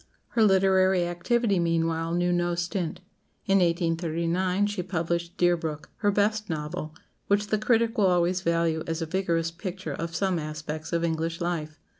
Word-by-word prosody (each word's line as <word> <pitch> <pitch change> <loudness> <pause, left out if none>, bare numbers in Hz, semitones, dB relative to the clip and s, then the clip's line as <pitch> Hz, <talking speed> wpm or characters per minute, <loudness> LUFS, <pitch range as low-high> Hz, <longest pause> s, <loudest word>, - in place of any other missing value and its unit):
Her 230 - 0
literary 190 -2 +4
activity, 195 +4 +1
meanwhile, 165 0 0
knew 175 0 +1
no 175 0 +1
stint. 175 0 -3 0.4
In 195 0 +4
1839 170 +2 +1
she 205 -2 -2
published 170 -1 -2
"Deerbrook," 165 -4 0
her 205 - +1
best 210 +1 +1
novel, 155 0 -4 0.3
which 205 +1 +2
the 215 - +1
critic 230 +1 +2
will 200 - +5
always 180 0 +2
value 165 -2 +1
as 165 0 -2
a - - -2
vigorous 165 -1 0
picture 180 -2 -5
of 165 +3 -5
some 190 -2 +1
aspects 155 +1 -5
of 170 -1 0
English 165 0 -1
life. 155 -3 -3
175 Hz, 155 wpm, -27 LUFS, 165-190 Hz, 0.4 s, will